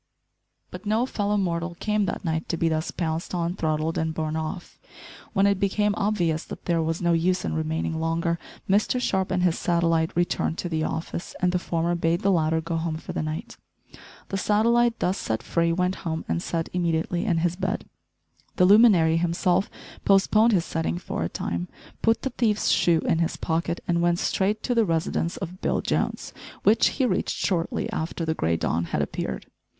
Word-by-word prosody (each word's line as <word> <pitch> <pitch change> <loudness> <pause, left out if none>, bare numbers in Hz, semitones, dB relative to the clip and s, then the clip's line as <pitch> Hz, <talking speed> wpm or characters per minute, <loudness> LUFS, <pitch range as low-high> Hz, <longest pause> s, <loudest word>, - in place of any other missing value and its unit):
But 215 - -8
no 220 +4 +2
fellow 210 -4 -1
mortal 170 -2 -1
came 210 -1 +1
that - - -4
night 160 0 -2
to 170 - -1
be 165 0 +1
thus 160 0 -1
pounced 165 +1 -3
on, 170 0 -1
throttled, 155 -1 -1
and 160 0 -1
borne 155 -1 -2
off. 160 +3 -5 0.5
When 195 -1 +3
it 200 -1 +2
became 205 +1 +1
obvious 180 -7 0
that - - -9
there 170 -2 +1
was 165 +2 -2
no 170 0 +3
use 180 +2 +1
in - - -2
remaining 160 0 -2
longer, 165 +1 0 0.3
Mr 210 +6 +2
Sharp 190 -6 0
and 180 - 0
his 175 -2 +2
satellite 165 -2 +2
returned 175 -1 0
to 175 - -3
the 160 -2 -1
office, 165 +2 -4
and 180 -1 +2
the 180 - +1
former 170 0 -1
bade 170 +1 +1
the 200 - +3
latter 160 -2 +2
go 165 +1 -3
home 160 -1 -2
for - - -7
the - - -1
night. 155 +1 -5 0.7
The 195 - -2
satellite, 235 +3 +3
thus 185 +2 0
set 110 0 -2
free, 170 0 +1
went 180 +2 0
home 160 -2 -4
and 170 - -1
set 165 -2 -2
immediately 170 0 0
in 185 -7 +1
his 170 +1 +1
bed. 190 +1 -2 0.7
The 180 - +4
luminary 190 -6 +6
himself 175 +2 +1 0.3
postponed 215 +3 +4
his 180 -6 +2
setting 165 +1 -2
for 175 - -4
a 85 - -1
time, 85 +1 -3 0.3
put 225 0 +2
the 265 - -1
thief's 220 -4 +1
shoe 170 -2 +3
in 165 - +1
his 165 - 0
pocket 170 +1 -2
and 170 -1 +1
went 175 0 +2
straight 200 +3 0
to 250 - 0
the 230 -1 +4
residence 165 -1 -1
of 180 +3 -7
Bill - - +1
Jones, - - -2 0.3
which 215 +2 +5
he 265 - +3
reached - - 0
shortly 170 -4 -1
after 165 +1 -3
the 160 - 0
grey 80 - 0
dawn 85 +1 0
had - - -1
appeared. - - -4
170 Hz, 195 wpm, -25 LUFS, 160-195 Hz, 0.7 s, luminary